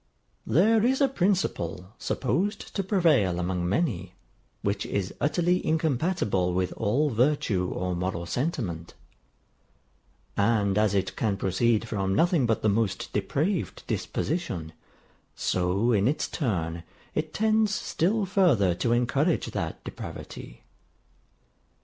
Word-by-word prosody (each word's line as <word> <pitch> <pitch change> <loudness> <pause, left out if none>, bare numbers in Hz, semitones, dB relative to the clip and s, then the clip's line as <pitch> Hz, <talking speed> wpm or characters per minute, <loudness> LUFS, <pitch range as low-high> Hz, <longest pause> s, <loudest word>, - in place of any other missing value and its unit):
THERE 215 +7 +4
is 260 +3 +2
a 275 - +5
principle, 175 - -1
supposed 200 - -1
to 195 - +1
prevail 155 - +3
among 90 -1 -1
many, 110 - -1 0.5
which 100 0 0
is 95 -2 -2
utterly 175 +4 +2
incompatible 145 - 0
with 90 0 0
all 130 +8 +1
virtue 115 -7 +1
or 90 0 -2
moral 90 -1 -2
sentiment; 100 - -3 1.4
and 100 -2 +2
as 105 -1 +2
it 95 -1 -1
can 105 -4 0
proceed 110 +5 +1
from 95 -3 -1
nothing 165 - +3
but 115 - 0
the - - +3
most 105 -1 0
depraved 155 - -1
disposition, 95 - -3 0.6
so 95 +6 +1
in 105 -1 +3
its 145 - 0
turn 85 - -2 0.3
it 155 0 -2
tends 215 -1 +2
still 200 +5 0
further 160 - +3
to 115 +7 0
encourage 135 +7 +1
that - - -4
depravity. - - -8
115 Hz, 120 wpm, -27 LUFS, -, 1.4 s, a